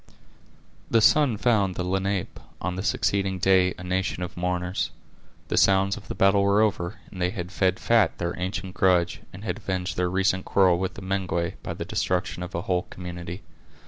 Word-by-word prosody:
The 115 - +4
sun 130 0 +4
found 100 -5 +2
the 90 - -2
Lenape, 95 +1 -2 0.2
on 90 +1 -3
the 95 - -3
succeeding 95 0 0
day, 95 0 +3
a 90 - -9
nation 90 0 -1
of 90 - -6
mourners. 90 +1 -1 0.6
The - - 0
sounds 95 0 +4
of - - -11
the - - -5
battle 100 +1 +4
were 100 +1 +3
over, 100 -3 0
and 95 - -8
they 90 - +2
had 90 -2 -5
fed 95 -2 +1
fat 115 -7 +3
their 85 0 -2
ancient 95 +1 -3
grudge, 90 -3 +2
and 95 +3 -10
had 95 -2 -2
avenged 95 -4 -3
their 90 0 +1
recent 95 0 +1
quarrel 90 -3 +3
with 95 0 -2
the 100 - -9
Mengwe, 95 -3 -1
by - - -5
the - - -5
destruction 90 -1 -1
of 90 +1 -6
a 85 - -1
whole 90 -1 -1
community. 90 0 -7
95 Hz, 190 wpm, -25 LUFS, 90-100 Hz, 0.6 s, The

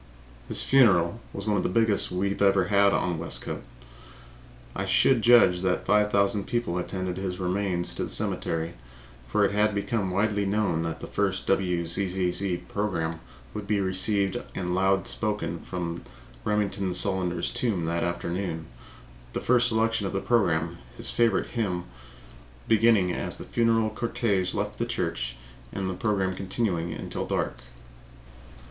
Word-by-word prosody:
His - - 0
funeral 105 -7 +4
was 100 - -6
one 105 -1 +1
of - - +1
the - - -1
biggest 110 +1 +2
we 100 +2 0
ever 100 -2 +4
had 100 +1 +4
in 90 -4 0
Westcote. 85 - -5 1.1
I - - -2
should 130 -4 +4
judge 110 -7 +6
that 95 -1 0
five 105 0 +3
thousand 100 0 +2
people 120 -7 -1
attended 95 0 -3
his 95 -1 -3
remains 90 -1 -1
to - - -2
the - - -7
cemetery, 80 +1 -1 0.5
for 105 -1 +2
it 100 - +1
had 105 0 +2
become 100 -1 -1
widely 100 +2 +1
known 100 -5 +1
that 80 0 -4
the - - -5
first 95 -2 -1
WZZZ 90 0 0
program 85 -6 -2 0.3
would 105 -1 -6
be 105 -1 +1
received 95 +1 +1 0.2
and 90 -1 -2
loud 95 0 +2
spoken 105 -6 -2
from 85 -1 -5 0.4
Remington 100 -3 -1
Solander's 90 -2 0
tomb 100 -9 -1
that 85 +1 -1
afternoon, 85 -1 -3 0.7
the - - -1
first 125 0 +3
selection 110 -2 +1
on - - -5
the 100 - 0
program 85 -7 +1 0.2
his - - -3
favorite 115 -4 +1
hymn 95 -7 -1 0.8
beginning 110 -5 +4
as - - -3
the - - -8
funeral 115 -2 +2
cortege 105 -5 0
left - - -3
the - - 0
church - - -2 0.4
and 95 -1 -3
the 95 - -2
program 95 -1 0
continuing 95 -3 -1
until - - -4
dark. - - -2
95 Hz, 150 wpm, -27 LUFS, 90-105 Hz, 1.1 s, judge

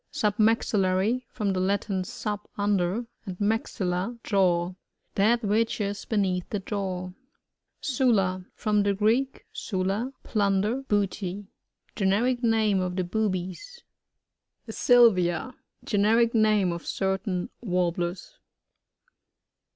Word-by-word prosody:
Submaxillary 210 +1 +1
— - - -46
From 205 -4 0
the 185 - -1
Latin, 195 0 0
su^, 205 +3 -4 0.2
under, 205 +2 0 0.2
and 185 -2 -5
maxtUa^ 205 0 -1
jaw. 180 -3 +2 0.4
That 230 +4 +3
which 220 +3 +1
is 200 -1 -3
beneath 190 -5 0
the 210 - -1
jaw. 185 -2 -4 0.7
SuLA. 215 -9 +1
— - - -50
From 210 -2 +1
the 200 0 +1
Greek, 230 +7 +1
stflu, 195 +5 -2
p1nn« 200 -3 +1
der, 235 +6 -1
booty. 205 -4 -2 0.5
Generic 230 +5 +1
name 220 -4 +2
of 180 -1 -2
the 185 - 0
Boobies. 210 - -3 0.8
Sylvia. 225 -2 +3 0.2
— - - -36
Generic 225 +3 +3
name 215 -5 +3
of 170 -1 -5
certain 190 -1 -2
Warblers. 180 - -2
205 Hz, 110 wpm, -26 LUFS, 185-225 Hz, 0.8 s, That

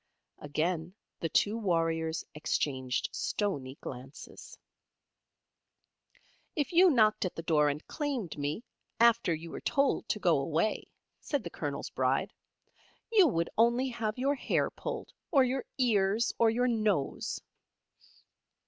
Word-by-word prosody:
Again 160 +4 -2 0.2
the 165 - -2
two 210 +6 +2
warriors 165 -4 0
exchanged 130 -4 -1
stoney 140 -11 -2
glances. 130 +3 -9 2.0
"If 295 +3 -1
you 360 +2 +7
knocked 220 -7 +4
at 185 - -3
the 165 - -5
door 150 -3 +3
and 145 +2 -4
claimed 275 - -3
me, 145 +9 -3 0.4
after 235 -5 +5
you 165 +1 -4
were - - -6
told 275 -4 +1
to - - +1
go 170 -7 +3
away," 165 +9 0 0.3
said 285 -6 -2
the 170 - -6
Colonel's 145 -2 -4
Bride, 130 0 0 0.8
"you 405 -6 +6
would 170 - 0
only 240 +3 +4
have 225 -2 -3
your 275 +3 +2
hair 280 - 0
pulled, - - -6 0.2
or 275 -6 +5
your 255 +1 -1
ears, 220 -3 +2
or 230 - +5
your 245 +3 +1
nose." 215 - 0
195 Hz, 130 wpm, -31 LUFS, 155-245 Hz, 2.0 s, you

